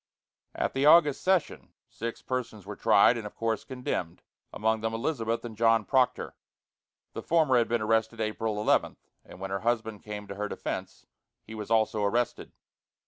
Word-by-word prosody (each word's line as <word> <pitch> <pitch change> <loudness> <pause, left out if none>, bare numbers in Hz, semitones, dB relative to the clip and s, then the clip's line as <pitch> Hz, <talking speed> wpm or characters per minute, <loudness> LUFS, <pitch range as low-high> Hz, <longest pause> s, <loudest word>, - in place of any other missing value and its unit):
At - - -1
the 135 +2 +2
August 150 -3 +6
session, 185 -3 0
six 115 +1 -6
persons 115 -6 -4
were 105 +1 -7
tried 110 +2 +5
and, 105 - -6
of - - -13
course, 115 -1 -1
condemned, 125 -10 -4 0.3
among 110 +1 0
them 110 0 -2
Elizabeth 115 -3 -2
and 115 -2 -7
John 115 -1 +3
Proctor. 130 -2 +1 0.8
The - - -5
former 160 -6 +2
had 115 - +1
been 115 -2 0
arrested 110 +1 +1
April 110 -1 -2
11, 105 - +1 0.3
and - - -14
when 95 0 -5
her 100 - -1
husband 110 -2 -1
came 105 -1 -7
to 100 - -7
her 105 +1 -3
defence, - - -6 0.4
he 110 - -11
was 105 -2 -7
also 110 -1 +2
arrested. 115 +4 -1
110 Hz, 170 wpm, -28 LUFS, 105-120 Hz, 0.8 s, August